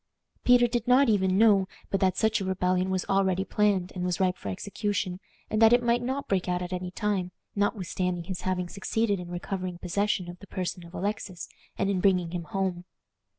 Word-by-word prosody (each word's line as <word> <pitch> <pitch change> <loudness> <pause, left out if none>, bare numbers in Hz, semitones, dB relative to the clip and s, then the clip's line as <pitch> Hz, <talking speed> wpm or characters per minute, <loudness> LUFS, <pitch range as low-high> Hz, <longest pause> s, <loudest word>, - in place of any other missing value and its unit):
Peter 245 -1 +6
did 240 0 -1
not 255 +1 +5
even 190 -3 +2
know 205 -3 +5 0.2
but 195 - +1
that 185 -1 +2
such 220 -1 +2
a - - -1
rebellion 185 0 0
was 185 -1 -1
already 190 -1 +1
planned 200 -4 +1
and 180 - -4
was 180 -1 -1
ripe 185 -1 +2
for 100 - -7
execution, 195 - -2 0.3
and 215 - -1
that 225 +1 +8
it 245 0 +4
might 240 0 +2
not 265 +3 -3
break 185 -2 0
out 180 0 0
at 180 +1 -5
any 180 0 -3
time, 190 -2 -1 0.2
notwithstanding 185 -3 -1
his 180 +1 -5
having 185 -1 -1
succeeded 205 +2 -1
in 175 -1 -7
recovering 180 0 -4
possession 185 +1 -1
of 175 0 -9
the 200 - -13
person 180 -1 -4
of 170 +1 -12
Alexis, 200 -2 -3 0.3
and - - +1
in 195 -2 0
bringing 180 -4 +2
him 175 -2 -4
home. 180 +1 -2
190 Hz, 200 wpm, -28 LUFS, 180-205 Hz, 0.3 s, that